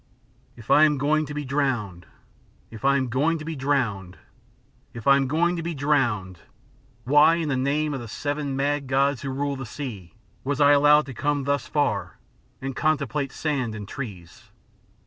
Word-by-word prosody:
"If 115 -1 -7
I 150 - +7
am 150 -2 +2
going 150 +2 +1
to 150 - -6
be 150 -1 -4
drowned 120 - -2 0.6
if 110 +1 -11
I 140 0 +4
am 130 -1 -1
going 145 +7 +1
to 155 - -8
be 165 0 -4
drowned 120 -10 -1 0.8
if 115 - -8
I 140 - +7
am 135 -1 +1
going 170 +5 +1
to - - -3
be 170 0 -4
drowned, 120 - 0 0.6
why, 150 +6 +5
in 165 -3 -2
the 135 - 0
name 145 +3 0
of 135 - -3
the 120 - -8
seven 145 +4 -3
mad 140 0 -1
gods 135 0 +1
who 140 - -4
rule 140 +1 -2
the 135 - -6
sea, 110 - -8 0.3
was 140 +2 -2
I 145 0 +6
allowed 150 +1 +5
to 135 - -8
come 145 +3 -1
thus 140 -2 -1
far 145 -1 -1 0.4
and 135 -1 -5
contemplate 140 -3 0
sand 130 -8 -2
and 105 -1 -7
trees? 95 -12 -9
140 Hz, 185 wpm, -24 LUFS, 125-150 Hz, 0.8 s, I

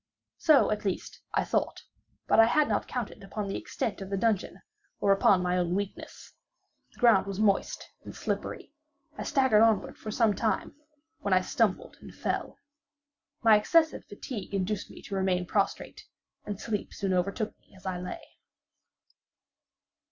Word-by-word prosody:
So, 305 -8 +5
at 210 - -1
least 195 -3 -3
I - - +3
thought: - - -1 0.4
but - - +3
I 225 - +9
had 300 +5 +3
not - - 0
counted 245 -4 -5
upon 200 +1 -4
the 195 - -3
extent 210 -3 -3
of 190 - -6
the 195 - -1
dungeon, 210 -1 0 0.4
or 200 - +3
upon 195 -1 +4
my 180 0 +1
own 175 0 0
weakness. 200 0 -6 0.6
The - - -22
ground 230 -6 +5
was 195 0 -4
moist 205 -2 +1 0.2
and - - -9
slippery. - - -4 0.4
I - - -6
staggered 260 -7 +3
onward 225 -2 +2
for 215 - -7
some 220 0 +3
time, 220 +3 -1 0.5
when 200 -10 +1
I 185 - +4
stumbled 205 +1 0
and - - -12
fell. - - -3 0.9
My 225 -2 +7
excessive 315 +10 +3
fatigue 205 -1 -6
induced 195 +1 -2
me - - -12
to - - -8
remain 190 -2 +1
prostrate; 200 +2 -1 0.4
and 205 -2 -5
sleep 215 -2 -4
soon 195 -2 -1
overtook 200 +4 -1
me - - -25
as 190 - -18
I 185 -1 -2
lay. 180 - -6
205 Hz, 160 wpm, -29 LUFS, 190-225 Hz, 0.9 s, I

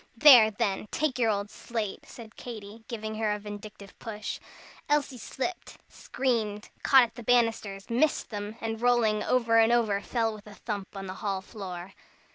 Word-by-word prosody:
"There, 250 -6 +9
then, 205 -1 -1
take 290 -5 -1
your 230 -2 +3
old 205 -1 -1
slate!" 220 -4 -5
said 225 -2 -12
Katy, 220 -2 -9
giving 220 -2 -5
her 215 -1 +1
a 210 - 0
vindictive 205 -1 -9
push. 215 -2 -5 0.5
Elsie 285 -4 +1
slipped, 275 +10 -5
screamed, 220 -5 -2
caught 265 -2 +7
at 230 -1 -3
the 240 - -9
banisters, 225 -4 +1
missed 250 +5 +1
them, 205 0 -5
and 225 0 -3
rolling 235 -3 +3
over 230 -2 +3
and 225 +1 +5
over, 220 -4 +2
fell 225 -1 -1
with 210 0 -12
a 205 - -11
thump 205 -3 -5
on 195 - -5
the 185 - -5
hall 195 -2 -2
floor. 185 -3 -8
220 Hz, 170 wpm, -28 LUFS, 205-240 Hz, 0.5 s, There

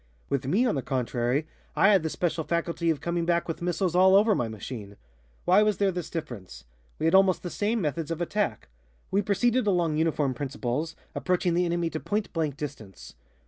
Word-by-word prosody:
With 135 -2 -1
me, 200 - +3
on 240 - +2
the 135 - -1
contrary, 125 +2 -1 0.3
I 195 - +5
had 195 -3 +5
the 160 - -2
special 170 0 -1
faculty 170 +1 -1
of 155 -3 0
coming 170 0 -1
back 170 0 +1
with 165 - -4
missiles 175 0 0
all 190 +1 +6
over 210 +2 +5
my 120 - 0
machine. 105 -1 -8 0.5
Why 185 +4 +5
was 210 -2 +2
there 200 -1 +2
this 180 -3 -5
difference? 100 - -7 0.3
We 155 - -2
had 165 - +3
almost 190 -1 +4
the 175 - -4
same 220 +3 0
methods 155 0 -2
of 165 -1 -3
attack. 175 - -2 0.4
We 200 - +3
proceeded 225 +4 +1
along 170 -5 +2
uniform 155 -4 +1
principles, 140 +4 -3 0.2
approaching 180 -1 0
the 175 +1 +2
enemy 170 -1 -1
to 155 - -3
point 210 +4 -2
blank 155 -4 -1
distance. 130 -10 -8
170 Hz, 195 wpm, -27 LUFS, 140-190 Hz, 0.5 s, all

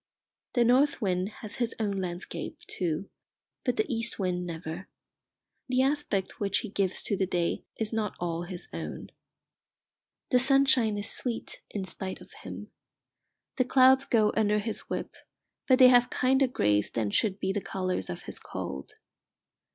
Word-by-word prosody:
The 240 - +4
north 260 +5 +4
wind 185 -3 0
has 215 -1 -9
his 240 -2 -1
own 200 -3 0
landscape, 175 -1 -5
too; 175 +1 -2 0.6
but - - 0
the 430 - +2
east 230 -1 -2
wind 180 -2 -1
never. 165 +2 -6 0.8
The 255 +1 +3
aspect 270 -9 -1
which 200 -1 +1
he 220 - -6
gives 195 -2 -1
to 205 - 0
the 190 -1 0
day 175 -2 -1
is 220 0 -2
not 215 -2 -1
all 170 -1 -2
his 175 0 -5
own. - - -6 1.2
The 250 - +6
sunshine 260 -5 +4
is 205 - -1
sweet 235 -3 -4
in 200 -2 -3
spite 185 0 -3
of - - -15
him. - - -8 0.9
The 255 - +3
clouds 265 +1 +6
go 215 -4 +3
under 210 -1 +3
his 210 +1 -3
whip, - - -3 0.5
but 255 - +6
they 255 -1 +9
have 245 -1 +6
kinder 265 +1 +3
greys 105 - +2
than 110 -3 -1
should 195 - +1
be 190 0 0
the 205 - -1
colours 185 - -2
of 90 - -5
his - - -5
cold. 70 0 -6
205 Hz, 160 wpm, -29 LUFS, 180-245 Hz, 1.2 s, they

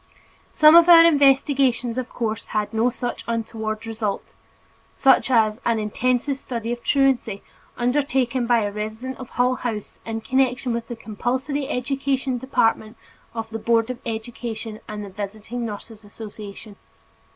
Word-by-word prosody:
Some 310 +1 +7
of 340 0 +8
our 335 -1 +10
investigations 270 -5 +3
of 255 -1 -3
course 220 -2 -3
had 210 0 -2
no 225 +2 +2
such 245 0 -5
untoward 220 -1 -3
results, 220 -3 -4 0.6
such 270 0 +4
as 220 -1 +2
"An 230 -1 +1
Intensive 250 +5 0
Study 235 -3 -4
of 240 0 -4
Truancy" 265 -7 +1 0.3
undertaken 255 -1 0
by 235 -1 +4
a 205 - -2
resident 220 +5 -5
of 255 - -8
Hull 250 +1 +2
House 220 -4 -5
in 225 0 -4
connection 255 +1 0
with 235 0 -3
the 240 - -5
compulsory 255 +6 -3
education 265 0 -1
department 225 -3 0 0.4
of 225 0 -5
the 225 - -4
Board 230 +2 +2
of 250 - -7
Education 225 -1 -5
and 210 -1 -6
the - - -9
Visiting 215 +4 -5
Nurses 215 +1 -9
Association. 205 0 -10
235 Hz, 145 wpm, -23 LUFS, 220-260 Hz, 0.6 s, our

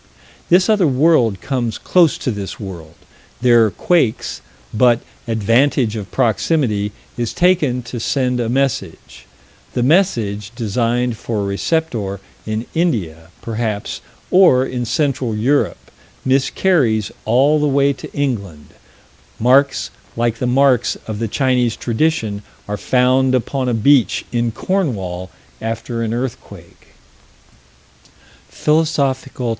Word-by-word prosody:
This 180 +2 +5
other 210 -6 +3
world 130 - +3
comes 125 -5 -2
close 175 -5 +3
to 125 - -2
this 100 -3 -6
world 85 -6 -9 0.5
there 120 -2 +5
are - - +1
quakes 125 - 0 0.3
but 120 +1 +4 0.3
advantage 115 +2 +2
of 105 -4 -6
proximity 110 -11 0 0.3
is 120 -2 -3
taken 150 -9 +2
to 120 +1 -6
send 125 +1 0
a 115 -2 -1
message 125 - -3 0.5
the 120 - 0
message, 115 - +1
designed 120 +1 -1
for 110 -2 -3
a - - -2
receptor 100 - -2 0.3
in 110 +2 -2
India, 95 - -1 0.2
perhaps, 110 -2 -3 0.3
or 170 -9 +5
in 125 -2 -3
Central 135 -5 -1
Europe, 130 +7 +1 0.5
miscarries 130 - +1
all 135 +7 +3
the 150 - +1
way 140 0 +2
to - - -10
England 100 - -3 0.7
marks 130 +2 +3 0.3
like 115 -1 0
the 125 - -1
marks 130 -1 +3
of 110 -2 -5
the 115 - -1
Chinese 125 -1 +1
tradition 115 -5 -1 0.3
are 105 - -2
found 130 +3 +2
upon 130 +1 -1
a 120 - 0
beach, 120 -2 +3
in 120 -1 0
Cornwall, 105 - -2 0.3
after 115 +1 -4
an 115 -1 -2
earthquake 120 +1 -7 1.6
_Phil. 155 +1 +2
120 Hz, 120 wpm, -18 LUFS, 110-140 Hz, 1.6 s, This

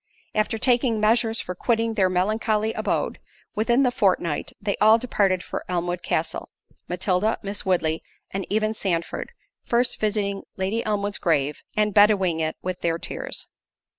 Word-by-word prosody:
——After 215 +1 +1
taking 240 -1 +2
measures 225 +1 +2
for 180 - -5
quitting 230 +4 0
their 190 -4 +3
melancholy 215 +4 +1
abode, - - -1 0.3
within 235 +5 +2
the 250 - +3
fortnight, 180 -8 +1
they 200 -1 -1
all 215 +1 +6
departed 200 -6 +1
for - - -5
Elmwood 175 0 -1
Castle—Matilda, 185 +4 -2
Miss 200 0 -4
Woodley, 165 -3 +1 0.3
and 195 0 -2
even 215 +1 +1
Sandford, 175 -6 -2 0.3
first 240 +1 +1
visiting 205 -2 0 0.2
Lady 195 +5 -1
Elmwood's 205 -1 -1
grave, 150 -3 +1 0.2
and 210 -1 +2
bedewing 195 -5 +4
it 160 0 -1
with 185 -1 -3
their 165 -1 +1
tears. - - -4
205 Hz, 140 wpm, -24 LUFS, 180-220 Hz, 0.3 s, all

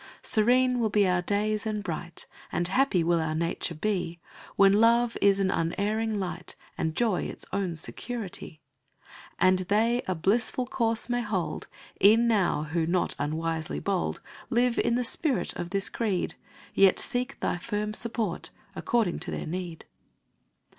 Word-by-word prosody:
Serene 250 +3 +3
will 225 -2 +1
be 205 -1 +3
our 180 -1 +2
days 210 +3 0
and 210 -1 -2
bright 170 -2 -4 0.3
And 175 0 0
happy 200 -5 +2
will 170 0 +2
our 155 0 -1
nature 165 +1 -2
be 175 -1 -2 0.4
When 195 0 +6
love 230 +2 +4
is 200 0 +4
an 195 -1 +2
unerring 210 +6 -1
light, 180 -2 -4 0.2
And 160 0 -2
joy 225 -6 +1
its - - -6
own 190 -4 -1
security. 185 -2 -5 0.8
And 185 0 +4
they 220 +6 +2
a 185 - 0
blissful 220 +8 +1
course 230 -2 0
may 245 0 0
hold 195 -6 -3 0.4
Ev'n 225 +4 +6
now, 195 -9 +2
who, 160 +1 -1
not 175 +1 +1
unwisely 160 +2 -2
bold, 195 -3 -1 0.3
Live 245 -1 +2
in 235 0 +2
the 250 - +1
spirit 270 +3 +1
of 175 - -4
this 195 +1 -1
creed; 205 -6 -1 0.4
Yet 195 -1 +5
seek 250 +1 -2
thy 175 - -1
firm 210 +1 -3
support, 220 -5 -2 0.3
according 225 -7 0
to - - -2
their - - -4
need. 175 0 -5
200 Hz, 155 wpm, -28 LUFS, 175-230 Hz, 0.8 s, When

